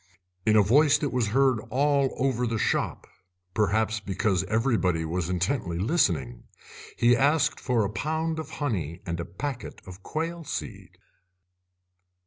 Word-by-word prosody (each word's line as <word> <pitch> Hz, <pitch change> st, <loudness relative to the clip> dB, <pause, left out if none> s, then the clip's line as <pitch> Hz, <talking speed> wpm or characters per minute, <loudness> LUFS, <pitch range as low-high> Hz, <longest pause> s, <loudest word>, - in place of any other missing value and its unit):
In 110 Hz, -, +5 dB
a 105 Hz, -, +6 dB
voice 140 Hz, +8 st, +5 dB
that 145 Hz, -, -2 dB
was 125 Hz, -3 st, 0 dB
heard 130 Hz, +1 st, +3 dB
all 140 Hz, +1 st, +2 dB
over 125 Hz, -2 st, 0 dB
the 115 Hz, 0 st, -1 dB
shop, -, -, -1 dB, 0.5 s
perhaps 110 Hz, +2 st, +1 dB
because 95 Hz, -2 st, 0 dB
everybody 105 Hz, -7 st, +1 dB
was 85 Hz, +1 st, -2 dB
intently 90 Hz, 0 st, -1 dB
listening, 85 Hz, -, 0 dB, 0.5 s
he 120 Hz, +1 st, +5 dB
asked 145 Hz, +4 st, +2 dB
for 125 Hz, -4 st, +1 dB
a -, -, -2 dB
pound 160 Hz, +5 st, -2 dB
of 155 Hz, -2 st, -6 dB
honey 90 Hz, -, -3 dB
and 85 Hz, 0 st, -3 dB
a 85 Hz, -, -3 dB
packet 120 Hz, +8 st, -6 dB
of 95 Hz, +1 st, -11 dB
quail 165 Hz, -, -4 dB
seed. -, -, -7 dB
110 Hz, 140 wpm, -26 LUFS, 90-140 Hz, 0.5 s, a